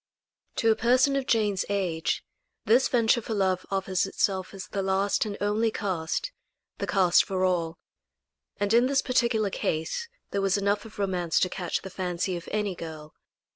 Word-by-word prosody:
To 225 -2 +3
a - - +3
person 255 +5 +3
of 270 -1 -1
Jane's 210 -5 +2
age, 180 -5 -1 0.4
this 240 +4 +4
venture 235 -1 +3
for 220 0 -4
love 190 -2 0
offers 190 -1 0
itself 190 -1 -1
as 195 -2 -7
the 200 - -3
last 195 +2 +1
and 200 - -5
only 210 +2 +1
cast 195 - -2 0.5
the - - -2
cast 185 -3 +4
for 185 -1 -1
all 170 -3 0 0.8
and 205 +1 +1
in 240 +2 +5
this 275 0 +2
particular 235 -5 +1
case 165 - -2 0.2
there 200 - 0
was 195 0 +2
enough 200 +2 0
of 220 - -12
romance 180 -4 0
to 185 - +2
catch 180 -1 -3
the 190 - -7
fancy 180 0 -2
of 170 -1 -7
any 210 -2 0
girl. 155 -3 -8
195 Hz, 175 wpm, -27 LUFS, 185-225 Hz, 0.8 s, in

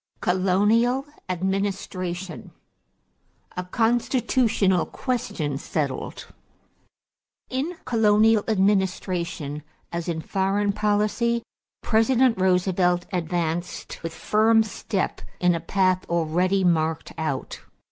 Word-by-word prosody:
COLONIAL 210 +8 +2 0.2
ADMINISTRATION 185 -1 -3 1.1
=A 180 - -3
Constitutional 225 -3 +1
Question 200 - -3
Settled.= 145 -4 -3 1.3
In 295 +7 -2
colonial 220 -1 +4
administration, 185 -7 0 0.3
as 170 0 -3
in 165 -1 -2
foreign 195 +4 0
policy, 215 +3 +1 0.4
President 230 0 +3
Roosevelt 180 -1 +2
advanced 175 0 -3
with 165 - -4
firm 220 +1 +3
step 205 -2 -3 0.2
in 180 0 +3
a 170 - -1
path 185 +2 +1
already 175 +3 +1
marked 160 -2 +1
out. 140 -4 -3
190 Hz, 85 wpm, -24 LUFS, 175-220 Hz, 1.3 s, colonial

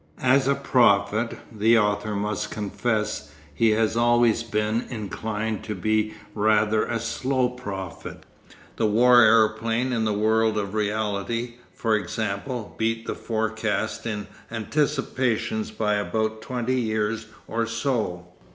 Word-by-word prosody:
As 130 +1 +4
a 140 - +3
prophet, 115 -4 +2
the 110 +1 +4
author 105 0 +1
must 105 0 -2
confess 105 -7 -2 0.2
he 115 +8 +3
has 110 +1 +2
always 120 -1 +3
been 110 0 -1
inclined 110 -1 -3
to 105 - -3
be 110 +3 0 0.2
rather 105 0 +2
a 115 - -2
slow 125 +3 0
prophet. 100 -8 -7 0.5
The 110 - +2
war 120 +3 +6
aeroplane 115 +2 +3
in 115 -2 0
the 110 - +1
world 110 +1 +2
of 100 -1 -2
reality, 110 +2 -2
for 110 -2 0
example, 110 +3 -3
beat 115 0 0
the - - -2
forecast 110 0 -2
in 105 -2 -3 0.2
Anticipations 135 - -1
by 105 - -1
about 110 +1 -1
twenty 125 +1 -1
years 110 0 -1 0.2
or 115 0 -1
so. 115 -7 -2
110 Hz, 125 wpm, -25 LUFS, 105-120 Hz, 0.5 s, war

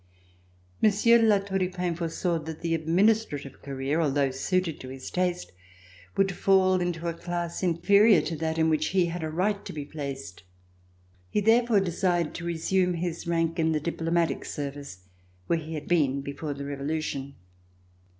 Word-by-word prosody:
Monsieur 220 +3 +5
de 225 - +4
La 210 -2 +5
Tour 195 -1 -2
du 185 -1 0
Pin 180 -1 -2
foresaw 170 0 -1
that 160 0 -8
the 165 -1 -1
administrative 165 - +1
career, 140 +3 -2
although 140 -3 +1
suited 170 +4 -1
to 130 - -9
his 130 0 -8
taste, 180 -1 -1 0.7
would 195 0 +3
fall 185 -1 +3
into 175 -1 -2
a 170 - -1
class 175 0 -4
inferior 200 +4 +5
to 165 +2 -3
that 160 +1 -2
in 160 0 +3
which 155 -1 +1
he 185 -1 +2
had 170 0 -4
a 160 - -2
right 200 +5 0
to - - -7
be 150 -2 -6
placed. 140 - -7 0.9
He - - +1
therefore 225 0 +4
desired 175 -2 0
to 170 - -6
resume 180 +2 +1
his 170 0 -4
rank 165 -1 0
in 160 0 +2
the 155 - +1
diplomatic 165 +1 -1
service 140 - -6 0.4
where 170 - +1
he 160 +1 -6
had 150 - -6
been 140 -6 +2
before 140 +1 -5
the 140 0 -6
Revolution. 140 -1 -3
165 Hz, 170 wpm, -27 LUFS, 150-185 Hz, 0.9 s, Monsieur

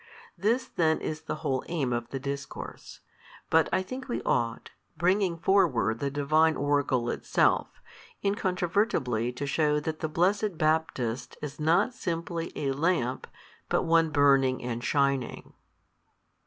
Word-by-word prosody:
This 235 +5 +1
then 160 -2 +1
is 155 0 -4
the 155 - -4
whole 130 -3 0
aim 140 -8 -1
of 120 0 -3
the 135 - -4
discourse: 140 0 -7 0.5
but 160 -1 +4
I 185 - +1
think 255 +6 -7
we 240 - -2
ought, 115 0 -1 0.3
bringing 180 +1 +2
forward 145 - +2
the 140 - -1
Divine 155 +3 +2
oracle 140 -4 +1
itself, - - +2 0.6
incontrovertibly 180 - 0
to 135 +3 -4
shew 150 +1 +1
that 155 +1 -4
the 160 - -2
blessed 190 +3 +1
Baptist 155 -7 -1
is 150 0 -6
not 165 +11 +2
simply 170 -5 -3
a 140 -2 -1
lamp, 135 -4 0 0.4
but - - +2
one 165 0 +3
burning 135 -3 +3
and 120 -1 -4
shining. 140 -3 0
155 Hz, 135 wpm, -28 LUFS, 135-170 Hz, 0.6 s, but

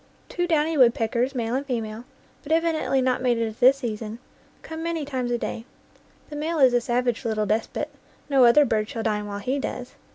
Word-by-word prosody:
Two 350 0 -1
downy 320 -1 +1
woodpeckers, 245 +1 +2
male 230 -1 -2
and 265 +2 0
female, 230 -3 -4 0.4
but 290 - -8
evidently 320 -4 +1
not 255 -1 +1
mated 240 -3 +1
at 220 0 -9
this 260 +2 +6
season, 225 -3 -5 0.5
come 320 0 -7
many 330 -2 -2
times 260 -3 -3
a 240 - 0
day. 230 - -4 0.7
The - - -6
male 320 +3 -2
is 260 -4 +5
a 245 - +3
savage 245 0 -1
little 215 -2 -1
despot; 215 +2 -1 0.4
no 275 -3 +4
other 285 +5 +6
bird 215 -3 0
shall 225 - -4
dine 210 -2 -1
while 200 0 -5
he 255 +7 -2
does. 250 -2 -5
250 Hz, 195 wpm, -24 LUFS, 225-285 Hz, 0.7 s, this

